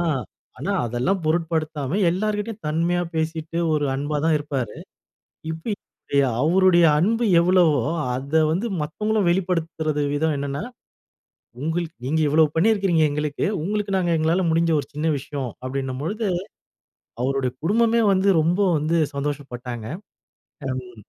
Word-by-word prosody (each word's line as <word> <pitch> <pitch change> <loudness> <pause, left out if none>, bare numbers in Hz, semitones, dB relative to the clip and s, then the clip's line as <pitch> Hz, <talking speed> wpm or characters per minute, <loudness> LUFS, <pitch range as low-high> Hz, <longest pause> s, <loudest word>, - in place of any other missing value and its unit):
ஆ - - -1 0.5
ஆனா - - -2
அதெல்லாம் 125 - 0
பொருட்படுத்தாம 155 -2 -1
எல்லார்கிட்டயும் 210 +3 -2
தன்மையா 170 +3 +1
பேசிட்டு 160 +1 -2 0.2
ஒரு 150 -1 +1
அன்பா 145 +2 -2
தான் 160 -1 +3
இருப்பாரு. 135 -7 -4 0.8
இப்ப 165 +7 -3 0.7
அவருடைய 175 +2 +5
அன்பு 225 +8 +2
எவ்வளவோ 170 -4 +4 0.3
அத 140 +5 +1
வந்து 185 +9 0
மத்தவர்களும் 210 +7 0
வெளிப்படுத்துவது 165 -4 -1
விதம் 155 +1 +1
என்னெனா 140 +2 -3 1.0
உங்க 160 +4 -1 0.2
நீங்க 155 +5 0
இவ்வளவு 155 +1 +4
பண்ணியிருக்கிறீங்க 195 -2 +3
எங்களுக்கு 150 0 -2 0.2
உங்களுக்கு 205 +2 -1
நாங்க 180 -2 +1
எங்களால 160 +4 +2
முடிந்த 165 +1 +2
ஒரு 140 - -10
சின்ன 150 +2 -2
விஷயம் 140 -2 -5 0.2
அப்டினும் 130 0 -3
பொழுது 215 +8 -2 1.0
அவருடைய 130 0 0
குடும்பமே 230 +5 +3
வந்து 190 +1 +2
ரொம்ப 170 +5 +1 0.2
வந்து 155 +3 0 0.2
சந்தோஷப்பட்டாங்க. 130 -5 -4 0.9
ம் 125 -2 -6
160 Hz, 120 wpm, -23 LUFS, 145-180 Hz, 1.0 s, அவருடைய